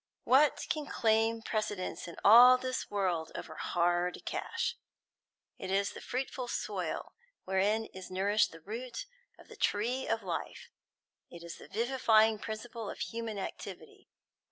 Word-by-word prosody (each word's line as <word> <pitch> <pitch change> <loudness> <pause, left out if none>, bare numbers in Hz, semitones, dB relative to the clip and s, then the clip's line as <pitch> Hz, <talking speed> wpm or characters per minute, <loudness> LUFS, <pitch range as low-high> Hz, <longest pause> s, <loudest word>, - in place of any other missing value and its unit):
What 280 +3 +4
can 300 -2 -2
claim 225 0 +2
precedence, 205 -6 -3
in 170 - -8
all 245 +4 +10
this 255 0 -3
world, 180 -5 -1
over 160 - -6
hard 175 +2 0
cash? 470 +1 -2 0.8
It 190 - -5
is 200 +1 +1
the - - -10
fruitful 255 0 -3
soil - - -3 0.3
wherein 200 +4 +1
is 190 -3 -10
nourished 200 +3 +2
the 165 - -12
root 240 - -6 0.3
of - - -17
the - - -12
tree 240 +6 0
of 225 -1 0
life; 175 -3 -5 0.6
it 170 -1 -11
is 170 - -8
the - - -12
vivifying 225 -2 +3
principle 220 0 -6
of - - -6
human 230 -2 -4
activity. 195 - -8
220 Hz, 140 wpm, -32 LUFS, 190-240 Hz, 0.8 s, all